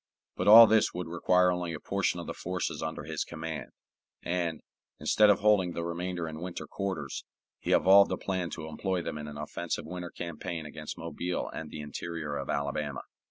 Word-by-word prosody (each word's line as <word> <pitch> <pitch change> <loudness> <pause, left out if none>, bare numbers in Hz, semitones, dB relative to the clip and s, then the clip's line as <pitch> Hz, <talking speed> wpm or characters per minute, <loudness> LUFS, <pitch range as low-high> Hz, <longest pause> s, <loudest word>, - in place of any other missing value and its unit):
But - - -2
all 115 +2 +12
this 110 -4 +3
would 90 0 -3
require 90 +2 +3
only 90 -1 -2
a 75 - -5
portion - - -1
of - - -6
the - - -4
forces 90 0 -3
under 80 -2 -4
his 80 0 -2
command; 80 -2 -6 0.5
and, 85 -3 -1 0.4
instead 105 -1 +4
of 100 - +4
holding 100 -4 +4
the 85 - -3
remainder 85 0 -3
in 80 0 -7
winter 90 -1 -5
quarters, 95 -9 -4 0.4
he - - -3
evolved 100 +1 +6
a - - 0
plan 95 -3 -2
to 80 - -7
employ 90 +2 -2
them 75 - -4
in 75 - -6
an 75 0 -8
offensive 80 +3 -4
winter 90 +1 -6
campaign 85 -1 -5
against 75 0 -7
Mobile 85 +2 -3
and 80 - -6
the 75 - -7
interior 75 +1 -5
of - - -4
Alabama. 70 0 -2
85 Hz, 190 wpm, -30 LUFS, 80-90 Hz, 0.5 s, all